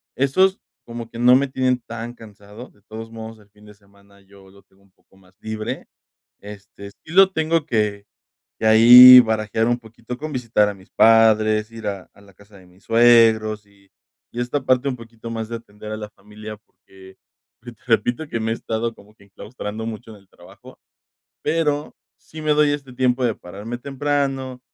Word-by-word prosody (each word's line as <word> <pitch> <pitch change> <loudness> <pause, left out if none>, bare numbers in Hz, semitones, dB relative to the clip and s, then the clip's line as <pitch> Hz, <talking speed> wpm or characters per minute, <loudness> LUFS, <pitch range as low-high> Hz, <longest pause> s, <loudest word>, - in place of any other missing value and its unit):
Esos, 185 +9 +1 0.3
como 115 -1 -8
que 115 - -12
no 125 +1 +5
me 140 +2 +1
tienen, 130 -1 -1
tan 115 0 -8
cansado, 105 +1 -14
de 100 - -30
todos 115 +1 -10
modos 110 -1 -10
el 105 -1 -23
fin 105 +1 -22
de 105 - -15
semana, 100 0 -25
yo 95 -1 -20
lo 100 0 -20
tengo 100 +1 -31
un 100 - -30
poco 95 - -30
más 95 -1 -25
libre. 110 0 -6 0.5
Este, 100 0 -12
sí 155 - -17
lo 195 +1 +6
tengo 160 -2 -1
que 105 -6 -2 0.5
que 110 - -3
ahí 125 +3 +10
barajear 110 0 -1
un 120 0 0
poquito, 115 +2 -10
con 155 +1 -7
visitar 115 -4 +1
a 105 - -5
mis 95 -1 -20
padres, 110 -1 +3
ir 115 -2 -8
a 100 -2 -6
a - - -22
la 100 -1 -20
casa 100 +1 -20
de 95 - -18
mis 90 +2 -25
suegros, 115 -2 +3
y 100 -1 -27 0.4
y 120 - -5
esta 125 +3 -3
parte, 130 +2 +1
un 130 - -4
poquito 115 0 -12
más 110 -1 -5
de 115 - -5
atender 105 -1 -12
a 110 - -5
la 105 -1 -8
familia, 105 +1 -12
porque, 95 -2 -20 0.5
pues, 120 -1 -11
te - - -33
repito, 120 +6 0
que 115 - -3
me 110 - -2
he 115 - -1
estado 115 0 -4
como 105 +2 -20
que 100 - -22
enclaustrando 105 +1 -8
mucho 115 0 -8
en 105 - -13
el 100 - -24
trabajo. 85 - -17 0.7
Pero, 150 -2 -2 0.2
sí 155 0 -12
me 155 - +1
doy 150 0 +3
este 140 -3 -6
tiempo, 125 0 0
de 115 - 0
pararme 105 +7 -9
temprano, 135 -1 -3
115 Hz, 195 wpm, -20 LUFS, 105-125 Hz, 0.7 s, ahí